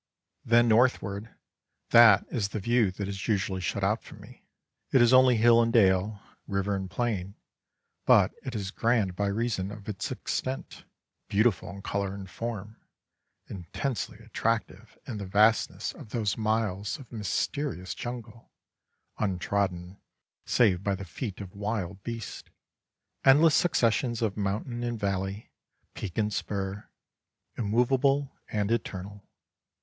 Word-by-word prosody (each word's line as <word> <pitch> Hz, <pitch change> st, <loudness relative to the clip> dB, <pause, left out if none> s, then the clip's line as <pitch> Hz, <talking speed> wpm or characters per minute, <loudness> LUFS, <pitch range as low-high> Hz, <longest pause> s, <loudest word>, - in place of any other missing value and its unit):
Then 120 Hz, +1 st, +4 dB
northward, 110 Hz, -2 st, +1 dB, 0.6 s
that 110 Hz, -4 st, +8 dB
is 100 Hz, -5 st, -1 dB
the 105 Hz, -, -4 dB
view 115 Hz, 0 st, +2 dB
that 100 Hz, +1 st, -4 dB
is 100 Hz, 0 st, -5 dB
usually 95 Hz, -3 st, 0 dB
shut 90 Hz, -, -2 dB
out -, -, +1 dB
from -, -, -13 dB
me. -, -, -16 dB, 0.4 s
It 130 Hz, -, +5 dB
is 120 Hz, +1 st, +5 dB
only 130 Hz, -1 st, +7 dB
hill 115 Hz, +1 st, +6 dB
and 115 Hz, 0 st, +1 dB
dale, 100 Hz, -1 st, +3 dB, 0.3 s
river 100 Hz, 0 st, -1 dB
and 95 Hz, -1 st, -4 dB
plain, 100 Hz, -2 st, -2 dB, 0.7 s
but -, -, +6 dB
it 130 Hz, -, -6 dB
is 100 Hz, -2 st, -3 dB
grand 115 Hz, -6 st, +1 dB
by 100 Hz, +2 st, 0 dB
reason 100 Hz, -2 st, -1 dB
of 105 Hz, -1 st, -10 dB
its 100 Hz, -3 st, -4 dB
extent, 130 Hz, +1 st, -4 dB, 0.4 s
beautiful 100 Hz, -4 st, +2 dB
in 100 Hz, +1 st, -9 dB
colour 100 Hz, -1 st, -2 dB
and 100 Hz, -1 st, -8 dB
form, 110 Hz, +1 st, -6 dB, 0.7 s
intensely 105 Hz, +6 st, -4 dB
attractive 115 Hz, 0 st, -3 dB
in 115 Hz, -, -5 dB
the 100 Hz, -2 st, -5 dB
vastness 105 Hz, +3 st, +2 dB
of -, -, -12 dB
those 110 Hz, -4 st, -1 dB
miles 110 Hz, -3 st, -1 dB
of 130 Hz, -, -14 dB
mysterious 105 Hz, -, -2 dB
jungle, 120 Hz, -2 st, -8 dB, 0.7 s
untrodden, 95 Hz, -2 st, -1 dB, 0.5 s
save 95 Hz, -7 st, +3 dB
by 100 Hz, -1 st, 0 dB
the 95 Hz, 0 st, -7 dB
feet 95 Hz, +3 st, -6 dB
of 95 Hz, -2 st, -9 dB
wild 100 Hz, -2 st, -3 dB
beasts; 115 Hz, 0 st, -7 dB, 0.7 s
endless 150 Hz, +4 st, +6 dB
successions 120 Hz, -, +2 dB
of 105 Hz, -3 st, 0 dB
mountain 105 Hz, +4 st, -2 dB
and 120 Hz, -2 st, -3 dB
valley, 100 Hz, +1 st, -3 dB, 0.4 s
peak 95 Hz, -5 st, -6 dB
and 105 Hz, -1 st, +1 dB
spur, 100 Hz, 0 st, -4 dB, 0.7 s
immovable 130 Hz, +5 st, +1 dB
and 105 Hz, 0 st, -1 dB
eternal. 100 Hz, -3 st, -4 dB
105 Hz, 135 wpm, -28 LUFS, 100-115 Hz, 0.7 s, that